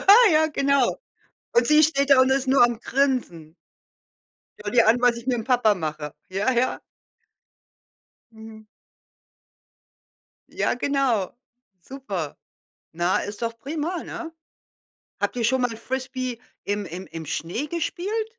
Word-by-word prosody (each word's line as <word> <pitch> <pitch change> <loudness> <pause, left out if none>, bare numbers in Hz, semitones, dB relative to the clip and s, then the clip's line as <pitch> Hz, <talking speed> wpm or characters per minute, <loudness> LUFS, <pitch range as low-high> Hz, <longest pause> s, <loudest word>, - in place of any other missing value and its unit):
Ja, - - -8 0.3
ja, 315 0 +4
genau. 280 -3 +1 0.6
Und 475 - +3
sie 305 0 +5
steht 280 -3 +2
da 270 -2 +7
und 260 0 +4
ist 270 0 +1
nur 265 -2 +6
am 240 -2 0
Grinsen. 245 - -1 1.1
Schau 205 - -4
dir 235 +1 +4
an, 235 +2 +4
was 245 -1 +4
ich 235 +1 -10
mit'm 245 -4 -1
Papa 245 -4 +3
mache. 155 -4 -5 0.2
Ja, 195 +6 0
ja. 250 +1 +1 1.5
Mhm. 220 -1 -12 1.8
Ja, - - 0
genau. 250 -6 0 0.5
Super. 195 - -6 0.6
Na, 175 +2 +1
ist 205 +2 -6
doch 230 0 -3
prima, 310 +7 -4
ne? 325 -1 -7 0.9
Habt - - -1
ihr 235 - -1
schon 260 +3 +2
mal 230 -2 -1
Frisbee 255 0 -4 0.3
im 205 0 -2
im 180 +3 -7
im 165 -1 -8
Schnee 175 - -3
gespielt? 395 +7 -3
245 Hz, 135 wpm, -24 LUFS, 210-275 Hz, 1.8 s, da